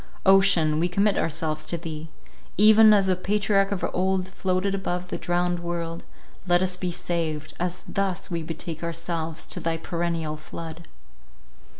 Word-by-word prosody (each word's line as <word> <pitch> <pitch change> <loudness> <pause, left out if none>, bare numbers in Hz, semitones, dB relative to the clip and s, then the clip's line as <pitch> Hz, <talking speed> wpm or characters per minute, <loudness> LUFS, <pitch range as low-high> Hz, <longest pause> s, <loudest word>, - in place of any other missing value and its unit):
Ocean, 190 -6 +5
we 170 - +2
commit 200 +3 +2
ourselves 155 -1 -1
to 170 - -1
thee 160 -1 -7 0.5
—even 215 +2 +8
as 200 -2 +5
the 185 -1 +2
patriarch 195 +1 +1
of 200 - -1
old 185 0 0
floated 185 +1 -1
above 180 -2 -3
the - - -3
drowned 175 0 0
world, 170 -1 -4 0.4
let 175 +1 +4
us 185 -1 0
be 180 0 -3
saved, 165 -3 -3
as 180 +1 -3
thus 195 -3 -2
we 170 -1 -1
betake 160 0 -6
ourselves 165 -1 -4
to - - -4
thy 165 0 -1
perennial 165 -2 -2
flood. 160 +1 -9
175 Hz, 155 wpm, -25 LUFS, 165-190 Hz, 0.5 s, even